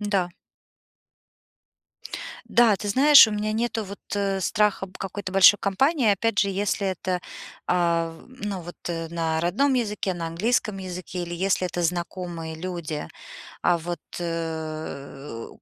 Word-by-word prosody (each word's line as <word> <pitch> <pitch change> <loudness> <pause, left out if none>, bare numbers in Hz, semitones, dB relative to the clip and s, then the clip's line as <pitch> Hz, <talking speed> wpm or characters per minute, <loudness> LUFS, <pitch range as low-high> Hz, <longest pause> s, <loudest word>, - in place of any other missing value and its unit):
Да. 200 -4 0 2.2
Да, 235 -3 +5
ты 205 - -5
знаешь, 275 +5 +8
у - - -4
меня 210 +1 -1
нету 225 0 -1
вот, 200 +1 -8 0.2
э, 195 -1 0
страха 210 0 +1
б 185 - -18
какой-то 195 -1 -5
большой 195 +1 +8
компании, 255 - +2
опять 215 +1 0
же, 200 - +4
если 200 +1 -1
это, 185 -1 -2 0.5
а, 170 -2 +2
в 165 - -14 0.2
ну, 195 -4 -3
вот, 175 +1 -9
э, 165 -1 -3
на 165 -1 -1
родном 240 +12 +2
языке, 210 -5 -1
на 170 -1 -4
английском 205 +4 0
языке 180 -1 -5
или 175 - -5
если 185 +1 +1
это 175 0 -3
знакомые 170 -1 -3
люди. 165 -3 -4 0.6
А 175 - +3
вот, 170 0 -5 0.2
э, 155 -6 -5
185 Hz, 140 wpm, -25 LUFS, 170-205 Hz, 2.2 s, знаешь